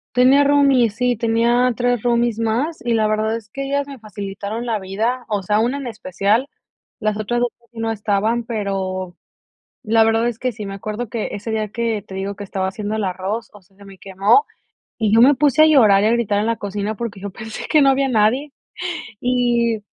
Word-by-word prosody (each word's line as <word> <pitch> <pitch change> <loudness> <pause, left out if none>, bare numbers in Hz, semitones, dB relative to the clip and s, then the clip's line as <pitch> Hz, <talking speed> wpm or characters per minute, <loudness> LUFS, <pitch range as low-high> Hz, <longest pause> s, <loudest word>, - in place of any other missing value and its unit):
Tenía 265 +3 +5
roomies, 275 -6 +3
sí, 250 -1 +1
tenía 235 +2 +2
3 245 -2 0
roomies 235 -2 +1
más, 240 +8 -1
y 240 - 0
la 220 -1 +2
verdad 215 +1 0
es 225 -2 -7
que 275 +5 -5
ellas 280 +1 -1
me 275 -2 -9
facilitaron 205 +2 -6
la 225 -2 0
vida. 220 +6 -2
O 205 -3 -2
sea, 210 +3 +1
una 245 +5 0
en 270 - -6
especial, 215 +4 -1 0.5
las 215 -1 0
otras 240 +3 -1
2 245 - +2
casi 235 -1 -18
no 225 0 -1
estaban, 220 +2 0
pero 190 -5 -3 0.7
la 225 0 +4
verdad 225 +1 +2
es 230 - -7
que 255 -2 -2
sí. 210 -1 -7
Me 195 0 -6
acuerdo 215 +3 -5
que 230 -3 -3
ese 210 +2 -5
día 215 -1 -1
que 225 -1 -2
te 190 -2 -10
digo 195 +1 -4
que 205 - -6
estaba 190 -1 -2
haciendo 210 +2 -4
el 215 - -2
arroz, 190 +5 -3
o 205 - -15
sea, 190 +1 -30
se 200 - -16
me 195 -1 -13
quemó, 200 - +2 0.5
y 215 -3 +1
yo 230 - +6
me 280 +3 +7
puse 295 +2 +3
a - - +8
llorar 215 -10 +5
y - - +3
a - - +2
gritar 215 -4 +1
en 215 - -1
la 230 0 0
cocina, 205 +1 -4
porque 225 -3 -5
yo 200 0 -5
pensé 220 +3 -8
que 310 - +5
no 275 - +5
había 270 0 +2
nadie. 250 +6 +2 0.7
Y 240 -2 +1
225 Hz, 215 wpm, -20 LUFS, 205-245 Hz, 0.7 s, a